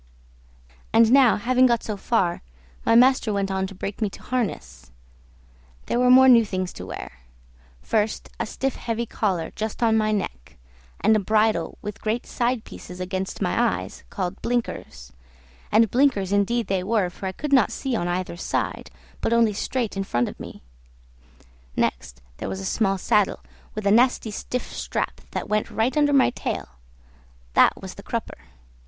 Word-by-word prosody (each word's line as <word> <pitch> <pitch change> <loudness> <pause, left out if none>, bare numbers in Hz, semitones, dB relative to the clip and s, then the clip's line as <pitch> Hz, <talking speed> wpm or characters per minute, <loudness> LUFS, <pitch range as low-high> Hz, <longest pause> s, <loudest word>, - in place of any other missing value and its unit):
And 225 0 +5
now 265 -3 +6
having 255 +4 +3
got 235 -2 +1
so 215 - -3
far, 195 -4 0 0.4
my - - +3
master 250 -2 +5
went 200 -1 -1
on 190 0 -1
to 195 - -11
break 195 +4 -6
me 215 - +1
to - - -13
harness; 205 - -4 0.9
there 240 - 0
were 250 0 +4
more 260 +1 +8
new 240 -3 +7
things 185 -3 -3
to - - -8
wear. 65 - -8 0.6
First, 215 0 0
a - - -1
stiff 270 -1 -2
heavy 235 0 -2
collar 190 -7 -2
just 220 +2 -3
on 225 -1 +4
my 215 -1 +2
neck, 120 - -4 0.4
and 220 +1 +4
a - - +3
bridle 215 -4 +1
with 210 -1 -6
great 225 +3 -1
side 240 -2 -1
pieces 180 0 -10
against 190 +2 -3
my 230 +6 +1
eyes - - -9
called 185 0 -4
blinkers, 75 - -3 0.6
and 220 0 +4
blinkers 240 -8 +2
indeed 215 +4 +1
they 190 -2 -1
were, 200 -3 +1
for 190 - -6
I - - -2
could 280 +9 -4
not 265 - +5
see 265 -3 -2
on 175 -5 -1
either 175 -1 -3
side, - - -3 0.3
but 230 - +1
only 230 -2 +4
straight 230 +2 -2
in 195 - -1
front 120 -10 0
of - - -9
me; - - -10 1.1
next, 60 0 -2
there - - -5
was 95 0 -4
a 95 - -6
small 195 - +1
saddle 210 +1 +1 0.3
with 215 -1 -4
a 200 - +4
nasty 235 0 +3
stiff 250 +4 -4
strap - - -3
that - - -4
went 210 0 0
right 235 +4 0
under 295 -1 +3
my 275 -2 +4
tail; - - -4 0.8
that - - +5
was - - -6
the - - -11
crupper. - - -4
215 Hz, 175 wpm, -24 LUFS, 190-235 Hz, 1.1 s, more